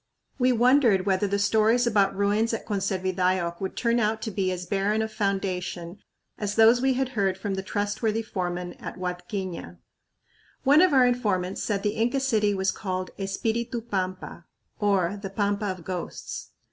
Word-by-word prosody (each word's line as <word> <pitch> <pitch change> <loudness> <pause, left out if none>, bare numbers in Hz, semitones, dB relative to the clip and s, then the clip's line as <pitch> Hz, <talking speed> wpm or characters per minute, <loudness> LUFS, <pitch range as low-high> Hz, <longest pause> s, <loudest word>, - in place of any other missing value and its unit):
We 255 0 +4
wondered 240 -5 +4
whether 195 0 +2
the 200 +1 0
stories 220 +4 +3
about 205 -4 +2
ruins 210 +3 +1
at - - -7
Conservidayoc 185 -3 -1
would 190 - -4
turn 235 0 +2
out 220 0 +1
to 220 - -3
be 190 -2 0
as 180 0 -4
barren 200 +4 0
of 220 0 -5
foundation 190 -3 -2 0.4
as 205 -1 -2
those 225 +2 +6
we 265 0 +3
had 260 0 -1
heard 195 -6 0
from 195 +1 -3
the 190 - -2
trustworthy 205 +3 -1
foreman 180 -3 -3
at - - -7
Huadquiña. 180 - -5 0.9
One 285 +4 +6
of 370 -2 +5
our 260 -3 +6
informants 205 -7 0
said 200 -2 -1
the 210 - +1
Inca 240 +5 +1
city 215 -6 +1
was 190 0 +1
called 185 -2 -4
Espiritu 225 +5 -2
Pampa, 185 -5 -4 0.3
or 200 -2 +1
the 195 - -5
"Pampa 205 +1 -1
of 185 -3 -4
Ghosts." 180 0 -6
200 Hz, 165 wpm, -26 LUFS, 185-225 Hz, 0.9 s, those